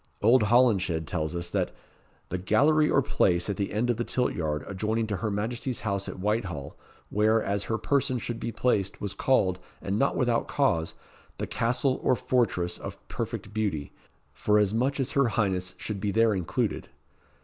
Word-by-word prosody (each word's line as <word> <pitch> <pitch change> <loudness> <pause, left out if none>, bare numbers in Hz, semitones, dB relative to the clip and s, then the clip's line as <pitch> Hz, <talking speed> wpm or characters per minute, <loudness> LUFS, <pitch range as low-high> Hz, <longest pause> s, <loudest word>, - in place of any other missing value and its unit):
Old 120 +4 +6
Holinshed 100 -8 +3
tells 80 +1 -2
us, 85 0 -3
that - - -1 0.5
"the 90 - -2
gallery 150 +11 +3
or 140 - +3
place 90 -7 +1
at 100 - -5
the 100 - -2
end 115 +4 +1
of 120 - -2
the 120 - 0
tilt 125 +1 0
yard, 75 -3 -2
adjoining 110 +3 -1
to 105 -3 -2
her 110 - -2
Majesty's 115 +5 -2
house 100 -3 -2
at - - -7
Whitehall, 95 -8 -2 0.4
where, 110 +2 +3
as 100 0 -1
her 110 - -1
person 130 +2 +1
should 120 0 -4
be 115 - -3
placed, 100 -6 0
was 100 -1 -3
called, 95 -5 +2 0.2
and 100 +2 -2
not 140 - +2
without 120 -3 +1
cause, 85 - +1 0.4
the - - -2
Castle 125 +3 +1
or 130 - +3
Fortress 100 -7 0
of - - -7
Perfect 105 - -5
Beauty, 100 -10 -2 0.4
for 105 0 +2
as 105 -1 +2
much 130 +5 0
as 135 0 -1
her 140 -4 +3
highness 95 -4 0
should 100 -3 -5
be 105 - 0
there 115 +1 +3
included." 90 -4 -2
105 Hz, 180 wpm, -27 LUFS, 95-120 Hz, 0.5 s, Old